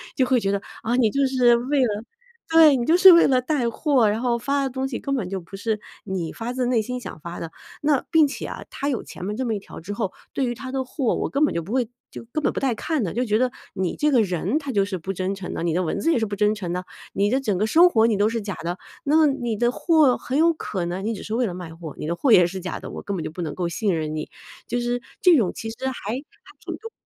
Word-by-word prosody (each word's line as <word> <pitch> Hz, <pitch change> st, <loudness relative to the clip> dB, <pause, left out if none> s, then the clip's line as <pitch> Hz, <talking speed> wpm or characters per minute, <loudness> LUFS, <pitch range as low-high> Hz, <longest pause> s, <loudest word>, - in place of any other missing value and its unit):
就 260 Hz, -, +3 dB
会 255 Hz, -1 st, +3 dB
觉 195 Hz, -3 st, 0 dB
得， 200 Hz, 0 st, -1 dB, 0.2 s
啊， 235 Hz, +2 st, 0 dB
你 240 Hz, -4 st, +4 dB
就 275 Hz, +4 st, +1 dB
是 250 Hz, -2 st, +4 dB
为 265 Hz, +4 st, 0 dB
了 215 Hz, -3 st, 0 dB, 0.5 s
对， 315 Hz, -3 st, +8 dB
你 240 Hz, -2 st, -1 dB
就 330 Hz, +6 st, +4 dB
是 375 Hz, 0 st, +10 dB
为 335 Hz, -, +6 dB
了 255 Hz, -2 st, +3 dB
带 255 Hz, -3 st, 0 dB
货， 245 Hz, -3 st, +2 dB
然 215 Hz, -, -1 dB
后 240 Hz, -2 st, +1 dB
发 280 Hz, +3 st, 0 dB
的 270 Hz, -, -1 dB
东 260 Hz, +1 st, -3 dB
西， 265 Hz, -3 st, -3 dB
根 275 Hz, 0 st, -2 dB
本 200 Hz, -8 st, -2 dB
就 195 Hz, 0 st, -3 dB
不 175 Hz, +2 st, -11 dB
是 215 Hz, +2 st, -2 dB, 0.2 s
你 185 Hz, -5 st, -4 dB
发 230 Hz, +1 st, -4 dB
自 250 Hz, 0 st, -1 dB
内 240 Hz, -3 st, +2 dB
心 250 Hz, +3 st, -4 dB
想 -, -, -8 dB
发 170 Hz, 0 st, -7 dB
的。 165 Hz, -, -5 dB, 0.3 s
那 290 Hz, -3 st, +2 dB
并 315 Hz, -3 st, +6 dB
且 275 Hz, -, -6 dB
啊， -, -, -6 dB
她 280 Hz, -, -3 dB
有 255 Hz, -, -1 dB
前 -, -, -9 dB
面 210 Hz, +4 st, -3 dB
这 260 Hz, -, -1 dB
么 230 Hz, -, 0 dB
一 -, -, -3 dB
条 -, -, -11 dB
之 190 Hz, +5 st, -6 dB
后， 200 Hz, -3 st, -2 dB, 0.2 s
对 270 Hz, -, 0 dB
于 240 Hz, -, -1 dB
她 260 Hz, +2 st, -8 dB
的 265 Hz, 0 st, -1 dB
货， 255 Hz, -1 st, -1 dB
我 -, -, -2 dB
根 285 Hz, +3 st, +3 dB
本 -, -, -1 dB
就 170 Hz, -, 0 dB
不 195 Hz, -, -9 dB
会 250 Hz, -3 st, +1 dB, 0.2 s
就 -, -, -9 dB
根 310 Hz, -, -1 dB
本 -, -, +2 dB
不 -, -, -3 dB
带 260 Hz, -4 st, 0 dB
看 310 Hz, +4 st, -1 dB
的。 170 Hz, -, -4 dB
就 245 Hz, -, 0 dB
觉 215 Hz, -3 st, +1 dB
得 255 Hz, +1 st, +2 dB, 0.3 s
你 190 Hz, -2 st, -1 dB
这 300 Hz, 0 st, +1 dB
个 245 Hz, -4 st, +5 dB
人， 185 Hz, -, -1 dB
她 285 Hz, -, -7 dB
就 205 Hz, -6 st, +2 dB
是 195 Hz, -1 st, -3 dB
不 190 Hz, +3 st, -4 dB
真 190 Hz, +1 st, -2 dB
诚 195 Hz, -2 st, -6 dB
的， -, -, -3 dB
你 170 Hz, -2 st, 0 dB
的 180 Hz, -, +1 dB
文 165 Hz, -, -2 dB
字 330 Hz, -, +2 dB
也 255 Hz, -, +2 dB
是 220 Hz, -, 0 dB
不 205 Hz, -1 st, -4 dB
真 210 Hz, +1 st, +2 dB
诚 185 Hz, -5 st, -4 dB
的， 180 Hz, +1 st, -3 dB, 0.3 s
你 200 Hz, +1 st, +2 dB
的 260 Hz, +4 st, +2 dB
整 215 Hz, -8 st, -1 dB
个 210 Hz, -, +1 dB
生 335 Hz, +10 st, +6 dB
活 225 Hz, -7 st, +4 dB
你 225 Hz, -3 st, +2 dB
都 205 Hz, +2 st, +3 dB
是 230 Hz, 0 st, -2 dB
假 200 Hz, -1 st, -4 dB
的， 175 Hz, +3 st, -4 dB, 0.3 s
那 310 Hz, +2 st, +5 dB
你 245 Hz, -5 st, -1 dB
的 240 Hz, +3 st, +2 dB
货 310 Hz, -5 st, +3 dB
很 260 Hz, +3 st, -3 dB
有 335 Hz, +2 st, +5 dB
可 195 Hz, -, -4 dB
能 180 Hz, +4 st, -3 dB
你 230 Hz, -, 0 dB
只 205 Hz, -, -7 dB
是 215 Hz, -, -5 dB
为 245 Hz, +2 st, +1 dB
了 190 Hz, -, -3 dB
卖 175 Hz, -2 st, -8 dB
货， 165 Hz, -3 st, -9 dB
你 -, -, -5 dB
的 170 Hz, +2 st, -2 dB
货 250 Hz, 0 st, +4 dB
也 180 Hz, -, +7 dB
是 185 Hz, +2 st, -4 dB
假 185 Hz, 0 st, -5 dB
的， -, -, -8 dB
我 -, -, -6 dB
根 200 Hz, -, -4 dB
本 165 Hz, -, -3 dB
就 -, -, -5 dB
不 175 Hz, -, -6 dB
能 155 Hz, -3 st, -4 dB
够 175 Hz, -2 st, -2 dB
信 195 Hz, +1 st, 0 dB
任 155 Hz, -1 st, -2 dB
你。 155 Hz, 0 st, -4 dB, 0.4 s
就 245 Hz, -, -1 dB
是 240 Hz, 0 st, -1 dB, 0.2 s
这 360 Hz, -5 st, +6 dB
种 200 Hz, -7 st, +1 dB
其 225 Hz, -, -5 dB
实 225 Hz, -, -7 dB
还 265 Hz, -, 0 dB, 0.2 s
还 300 Hz, -, -10 dB
挺 -, -, -6 dB
重 455 Hz, -, -9 dB
230 Hz, 325 characters per minute, -23 LUFS, 195-265 Hz, 0.5 s, 是